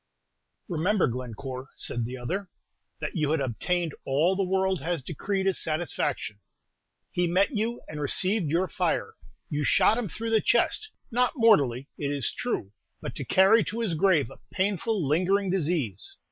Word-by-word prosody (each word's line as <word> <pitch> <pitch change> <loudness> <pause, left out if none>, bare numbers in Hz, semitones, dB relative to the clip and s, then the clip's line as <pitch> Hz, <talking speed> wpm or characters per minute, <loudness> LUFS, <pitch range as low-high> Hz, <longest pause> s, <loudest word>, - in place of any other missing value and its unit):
"Remember, 185 +2 +2
Glencore," 125 +2 -5
said 120 -1 0
the 125 +2 -5
other, 185 +11 -4 0.5
"that - - -4
you 155 -4 +1
had 160 0 +2
obtained 160 +6 -1
all 155 +8 +2
the 195 - 0
world 190 -2 +1
has 165 -1 -2
decreed 190 +6 -2
as 195 -1 +1
satisfaction. 155 -9 -2 0.7
He 175 0 +1
met 195 - +2
you 225 +3 -1
and 150 -1 -6
received 185 +4 +2
your 175 +5 +1
fire; - - -1 0.3
you 150 0 -2
shot 220 - +4
him 225 -5 -3
through 225 +4 -4
the 220 -1 +4
chest, 435 - +2 0.2
not 250 +2 +2
mortally, 140 - +4
it 145 - -1
is 140 -2 -1
true, 230 - -3 0.3
but - - -6
to - - -5
carry 195 +4 +5
to 230 +2 -3
his 215 -7 0
grave 160 -7 +3
a - - -13
painful, 195 -2 0
lingering 185 +6 +2
disease. 155 - -1
175 Hz, 160 wpm, -27 LUFS, 140-200 Hz, 0.7 s, carry